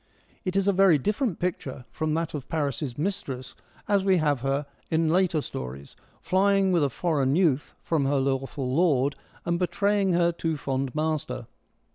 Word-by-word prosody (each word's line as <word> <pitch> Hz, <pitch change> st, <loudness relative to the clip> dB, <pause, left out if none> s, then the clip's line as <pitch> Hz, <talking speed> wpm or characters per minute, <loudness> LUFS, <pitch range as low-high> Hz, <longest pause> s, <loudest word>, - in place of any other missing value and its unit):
It 185 Hz, 0 st, -2 dB
is 195 Hz, 0 st, +2 dB
a 200 Hz, -, +4 dB
very 190 Hz, -4 st, +5 dB
different 210 Hz, -, -1 dB
picture 145 Hz, -8 st, -3 dB
from 155 Hz, -1 st, -1 dB
that 165 Hz, 0 st, -2 dB
of 145 Hz, -4 st, -6 dB
Paris' 145 Hz, -5 st, -2 dB
mistress, 145 Hz, -8 st, -3 dB, 0.3 s
as 200 Hz, -2 st, +2 dB
we 190 Hz, -1 st, +4 dB
have 145 Hz, -4 st, +1 dB
her 135 Hz, +2 st, 0 dB, 0.2 s
in 160 Hz, 0 st, +2 dB
later 175 Hz, -2 st, +2 dB
stories, 65 Hz, -, -7 dB, 0.3 s
flying 195 Hz, 0 st, +3 dB
with 170 Hz, -4 st, +3 dB
a 140 Hz, -, +2 dB
foreign 140 Hz, -2 st, 0 dB
youth 160 Hz, -6 st, +1 dB
from 155 Hz, -4 st, +1 dB
her 140 Hz, +1 st, +2 dB
lawful 135 Hz, -1 st, -1 dB
lord, 145 Hz, -4 st, +2 dB, 0.3 s
and 170 Hz, 0 st, 0 dB
betraying 200 Hz, +1 st, +1 dB
her 170 Hz, 0 st, +3 dB
too 165 Hz, -2 st, -2 dB
fond 135 Hz, -1 st, -2 dB
master. 155 Hz, -1 st, -2 dB
160 Hz, 165 wpm, -26 LUFS, 135-185 Hz, 0.3 s, very